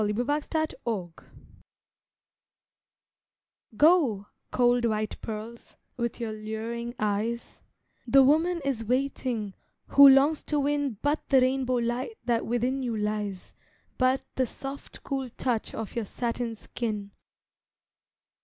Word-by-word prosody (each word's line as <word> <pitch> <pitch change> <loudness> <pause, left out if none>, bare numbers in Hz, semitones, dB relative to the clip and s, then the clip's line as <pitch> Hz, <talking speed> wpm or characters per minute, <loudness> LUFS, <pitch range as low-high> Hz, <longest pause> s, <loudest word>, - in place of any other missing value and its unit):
A 210 - +1
PEARL 235 +4 0
NECKLACE 260 - -2 2.5
Go, 290 - +4 0.2
cold 245 -1 +3
white 215 -2 -1
pearls, 225 +2 -7 0.2
with 235 -1 -3
your 225 -2 -3
luring 225 +3 -5
eyes, 215 +3 -2 0.5
The 270 +3 +7
woman 325 +5 +3
is 260 -5 -1
waiting 250 -4 -1 0.4
who 280 0 +9
longs 275 +3 +5
to 295 - 0
win 285 -4 0
But 290 +2 0
the 270 - +6
rainbow 255 0 +1
light 245 - -2
that 235 -2 0
within 245 +3 0
you 235 -3 -2
lies, 210 -3 -3 0.5
But 255 +1 +2
the 260 -1 +2
soft 275 +4 -8
cool 270 -2 -3
touch 240 -4 -1
of 225 -2 -6
your 235 -2 -1
satin 235 +1 -3
skin. 210 -2 -4
240 Hz, 115 wpm, -27 LUFS, 220-270 Hz, 2.5 s, who